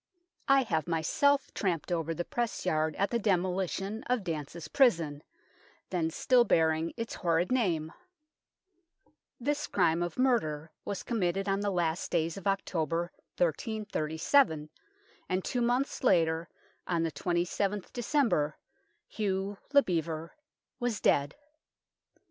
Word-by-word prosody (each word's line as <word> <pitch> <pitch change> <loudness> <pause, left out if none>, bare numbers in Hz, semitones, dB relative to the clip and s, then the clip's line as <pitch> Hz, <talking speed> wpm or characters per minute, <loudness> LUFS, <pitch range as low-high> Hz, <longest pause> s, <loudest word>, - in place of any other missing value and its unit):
I 275 -1 +5
have 160 - -1
myself 260 - +2
tramped 180 -3 -1
over 165 -1 -1
the 175 - -3
press 240 -5 -2
yard 155 -3 +1
at 200 - 0
the 235 - +1
demolition 195 +1 0
of 250 -4 0
Dance's 165 -1 -5
prison, 165 - +3 0.7
then 170 -3 0
still 245 +8 +4
bearing 160 -4 +2
its 230 -1 -4
horrid 170 +2 0
name. 175 -11 +1 1.5
This 290 +4 -1
crime 170 -3 +2
of 175 0 -3
murder 160 - +1
was 200 -2 -4
committed 195 -4 -1
on 195 0 +1
the 205 0 0
last 175 -2 -1
days 165 -1 0
of 195 0 -5
October, 175 -3 -1 0.3
1337, 165 - +1 0.6
and 185 0 -1
two 250 - -1
months 250 +4 0
later, 165 -6 +3 0.4
on 170 -2 +1
the 165 - -1
27th 180 +4 -1
December, 235 - +1 0.5
Hugh 195 -1 -2
le 285 -1 +6
Bevere 165 -2 -2 0.5
was 240 -4 -1
dead. 140 0 +2
180 Hz, 125 wpm, -30 LUFS, 160-220 Hz, 1.5 s, le